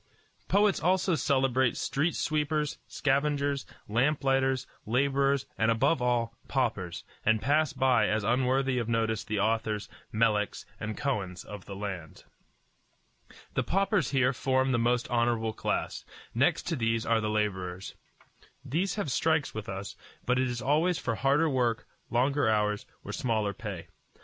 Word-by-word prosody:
Poets 205 0 +3
also 185 +2 +2
celebrate 130 -5 +2
street 150 +4 0
sweepers, 150 -1 -1
scavengers, 140 0 0 0.2
lamp 135 +8 +1
lighters, 135 -1 +2 0.2
laborers, 140 +2 +2
and 115 - +3
above 115 +6 +2
all, 120 -1 0
paupers, 105 -10 -1 0.2
and 110 0 +3
pass 150 +5 +2
by 130 -2 +3
as 110 -1 0
unworthy 130 +3 +2
of 115 -1 -3
notice 110 -2 0
the 105 -1 -2
authors, 110 0 0 0.2
Meleks, 105 -2 +1
and 105 0 -4
Kohens 105 -11 -2
of 105 -2 -9
the 100 - -7
land. 95 -6 -6 1.3
The - - +1
paupers 195 +2 +1
here 130 -1 +2
form 130 +1 +1
the 120 - +2
most 120 +1 +1
honorable 115 -2 +1
class. - - -2 0.3
Next - - +2
to 165 - 0
these 115 -3 0
are 115 -1 +2
the 105 - -1
laborers. 95 -4 -2 0.7
These 180 +7 -1
have 200 -10 -2
strikes 155 +2 +1
as - - -26
with 110 -2 -6
us; 95 +1 -5 0.3
but 125 +1 +2
it 130 - +2
is 120 0 -4
always 160 +5 +2
for 120 - -2
harder 135 +9 +2
work, 125 -5 0 0.2
longer 130 +1 +2
hours, 105 -1 +1 0.2
or - - -6
smaller 110 -4 0
pay. 100 -7 -6
125 Hz, 150 wpm, -29 LUFS, 110-140 Hz, 1.3 s, Poets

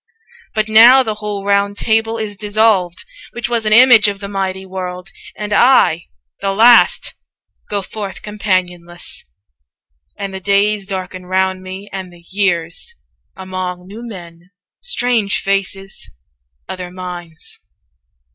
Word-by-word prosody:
But 215 0 0
now 235 +5 +7
the 220 -3 -2
whole 205 -2 -4
ROUND 200 0 +1
TABLE 225 0 0
is 215 -2 -4
dissolved 205 - +1 0.3
Which 240 - -3
was 235 -2 -1
an - - +1
image 235 -2 +7
of 200 -1 -3
the 200 - -6
mighty 190 -1 -3
world; 185 0 -6 0.3
235 - - -6
And 210 0 -3
I, 220 -10 +4 0.3
the 195 0 -1
last, 235 +4 +5 0.6
go 205 -1 -1
forth 200 -1 -7
companionless, 180 - -3 0.9
And 200 -1 -5
the 190 - -5
days 200 +1 +1
darken 185 -1 -5
round 190 0 0
me, 190 +2 -8
and 190 -2 -6
the 170 -1 -18
years, 185 - -1 0.4
Among 185 -1 -5
new 205 +5 -10
men, 175 -6 -11 0.3
strange 245 - 0
faces, 195 0 -3 0.6
other 180 -1 -6
minds.' 175 -3 -9
195 Hz, 130 wpm, -17 LUFS, 185-215 Hz, 0.9 s, now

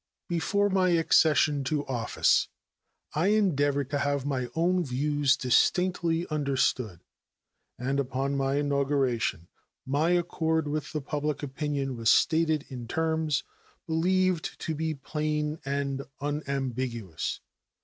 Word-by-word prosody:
Before 200 +4 +1
my 190 -2 +2
accession 155 -3 +3
to 150 0 -1
office 120 -4 +2 0.7
I 160 +5 +1
endeavored 145 -10 +2
to 145 - 0
have 140 -1 0
my 130 -3 -1
own 175 +2 +2
views 145 +1 +1
distinctly 170 +5 +2
understood, 130 - 0 0.8
and 135 +3 -1
upon 135 +1 -1
my 135 0 0
inauguration 140 - 0 0.4
my 145 +5 +1
accord 160 -3 +1
with 150 +1 -3
the 155 - -3
public 150 +1 -3
opinion 140 -1 -2
was 115 -1 +1
stated 160 0 +3
in 125 -4 -7
terms 160 -1 0 0.4
believed 180 +1 +1
to 160 - -2
be 160 0 -2
plain 150 +2 -2
and 140 0 -2 0.2
unambiguous. 130 - -3
145 Hz, 115 wpm, -28 LUFS, 135-160 Hz, 0.8 s, accession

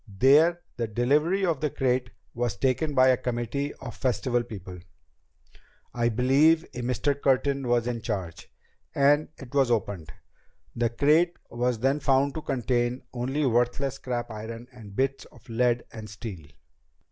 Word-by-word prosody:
There 145 - +4 0.2
the 115 - -1
delivery 150 - +1
of 165 -6 0
the 150 - +1
crate 125 -2 0 0.2
was 120 -4 -2
taken 135 +6 0
by 130 0 +6
a 130 - +4
committee 125 +4 -2
of 125 -3 -8
the - - -17
Festival 125 -1 0
people 95 -6 -9 1.1
I 120 -1 +1
believe 140 +8 +4
a 125 - -5
Mr. 125 +4 0
Curtin 135 0 +1
was 120 -1 +2
in 120 -1 -3
charge 95 -7 -5 0.4
and 145 +2 +3
it 135 -1 -12
was 135 -3 +3
opened. 100 -9 -2 0.6
The 120 0 +1
crate 150 +8 +3
was 120 0 0
then 135 +5 +1
found 140 0 +2
to 155 - -5
contain 125 -2 -1
only 130 +4 -1
worthless 125 +2 +1
scrap 120 -3 -4
iron 115 +2 -7
and 110 -5 -12
bits 135 +2 -1
of - - -19
lead 120 +1 +1
and 110 -1 -8
steel." 95 -6 -8
125 Hz, 155 wpm, -27 LUFS, 115-140 Hz, 1.1 s, by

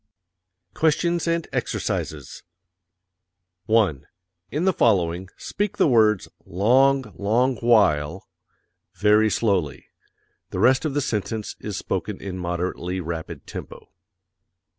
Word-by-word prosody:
QUESTIONS 165 - +1
AND 170 -1 0
EXERCISES - - -3 1.3
1. 95 -11 +2 0.4
In 155 +5 -2
the 190 - +3
following, 95 - +1
speak 205 -1 -3
the - - +4
words 110 -6 +3 0.2
"long, 125 +5 +2
long 120 +6 +1
while" 95 -8 +2 0.7
very 105 +1 +4
slowly; 95 -11 -1 0.6
the - - -6
rest 130 +4 +3
of 145 -3 -2
the 145 - +2
sentence 110 -2 -3
is 105 -2 -5
spoken 95 +2 -3
in 95 -2 -6
moderately 90 +1 -3
rapid 85 -2 -6
tempo. - - -9
105 Hz, 105 wpm, -23 LUFS, 90-130 Hz, 1.3 s, the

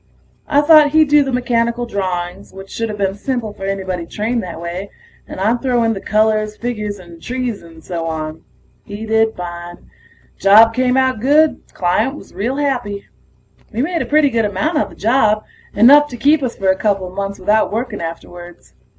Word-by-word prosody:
I 290 0 +3
thought 300 -1 +6
he'd 315 -2 +4
do 295 0 +6
the 270 - -3
mechanical 240 -1 0
drawings, 185 -3 -4
which 195 0 -11
shoulda 225 -2 -3
been 195 -2 -1
simple 225 0 -4
for 195 - -8
anybody 190 -3 -3
trained 225 +6 -2
that 175 -4 -7
way, 175 +4 -6 0.4
and - - -8
I'd 225 +5 +1
throw 245 -3 +1
in 225 0 +1
the 195 - -6
colors, 215 0 +1
figures 215 -4 -4
and 170 -3 -14
trees 250 -3 -4
and 165 -1 -15
so 165 -2 -4
on. 155 -1 -5 0.4
He 205 +2 -7
did 220 0 +1
fine. 175 0 -8 0.5
Job 220 +3 +6
came 255 +1 +1
out 260 -3 +1
good; 295 +6 +3
client 185 +10 0
was - - -13
real 225 +8 -2
happy. 250 -9 -2 0.7
We 235 +3 -1
made 335 +1 -1
a - - -3
pretty 295 -2 +3
good 230 -1 +1
amount 255 - -1
on - - -1
the - - -14
job, 215 -1 +2 0.3
enough 285 +7 +7
to 245 - -9
keep 295 +4 +3
us 255 -3 -3
for 195 -1 0
a 190 - +4
coupla 195 -3 -1
months 200 0 -4
without 210 +3 +1
working 225 -1 -3
afterwards. 175 +1 -9
215 Hz, 185 wpm, -17 LUFS, 190-250 Hz, 0.7 s, enough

